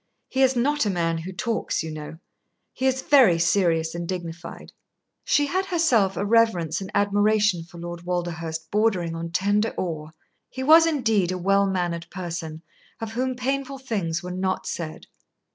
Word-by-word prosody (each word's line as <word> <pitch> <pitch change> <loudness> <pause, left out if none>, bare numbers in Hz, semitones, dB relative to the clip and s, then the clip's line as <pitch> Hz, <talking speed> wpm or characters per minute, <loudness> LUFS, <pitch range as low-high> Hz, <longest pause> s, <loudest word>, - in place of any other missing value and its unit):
"He 265 - 0
is 265 0 +4
not 280 0 +1
a - - +1
man 165 -3 0
who 175 +4 -6
talks, 225 -1 -2
you 160 - -5
know. 155 +1 -7 0.6
He 260 - 0
is 260 0 0
very 255 - +6
serious 165 -2 +2
and 170 0 -4
dignified." 170 -2 -6 0.5
She 290 - +2
had 375 +6 -1
herself 245 - +2
a 200 - -1
reverence 200 -7 +2
and 190 - -6
admiration 205 -2 +2
for 170 - -14
Lord 175 0 -7
Walderhurst 170 -2 -4
bordering 195 -6 +1
on 165 0 -4
tender 205 +5 +1
awe. 155 -4 -3 0.4
He 260 - -5
was 325 +4 +7
indeed 225 - +1
a 185 - -2
well 195 +2 +2
mannered 175 -3 -2
person, 165 -3 -6 0.4
of 225 -1 -5
whom 255 +2 -1
painful 270 +2 -2
things 195 -11 -3
were 180 - -5
not 185 +1 -2
said. 160 -2 -5
190 Hz, 165 wpm, -24 LUFS, 170-235 Hz, 0.6 s, was